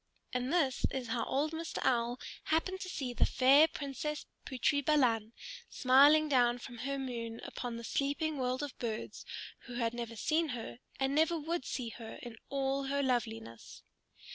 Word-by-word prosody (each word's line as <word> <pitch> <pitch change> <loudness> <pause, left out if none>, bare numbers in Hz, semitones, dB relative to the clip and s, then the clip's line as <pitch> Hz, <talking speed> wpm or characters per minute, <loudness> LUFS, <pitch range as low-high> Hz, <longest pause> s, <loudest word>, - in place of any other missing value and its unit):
And 250 +1 -1
this 280 -8 +2
is 255 -3 -4
how 230 0 0
old 295 +3 0
Mr. 325 0 -4
Owl 240 0 +1 0.3
happened 370 +4 0
to 370 - -4
see 265 -8 -3
the - - +2
fair 275 +4 +6
Princess 295 0 -4 0.2
Putri 285 +2 +1
Balan, 240 -7 +3 0.4
smiling 285 +4 +6
down 245 -4 +4
from 240 -1 -9
her 275 +3 -2
moon 235 -4 -4
upon 240 -2 -5
the 235 - -7
sleeping 285 +4 -1
world 255 +2 0
of 290 - -5
birds 225 -3 -4 0.4
who 245 - -7
had 230 -1 0
never 235 -1 -5
seen 315 +7 +1
her 235 +1 -7 0.2
and 270 0 +1
never 320 +3 +3
would 320 -2 -2
see 250 -3 -3
her 225 0 -8
in 240 -2 -7
all 275 0 0
her 280 +1 0
loveliness. 225 - -3
265 Hz, 165 wpm, -33 LUFS, 240-295 Hz, 0.4 s, fair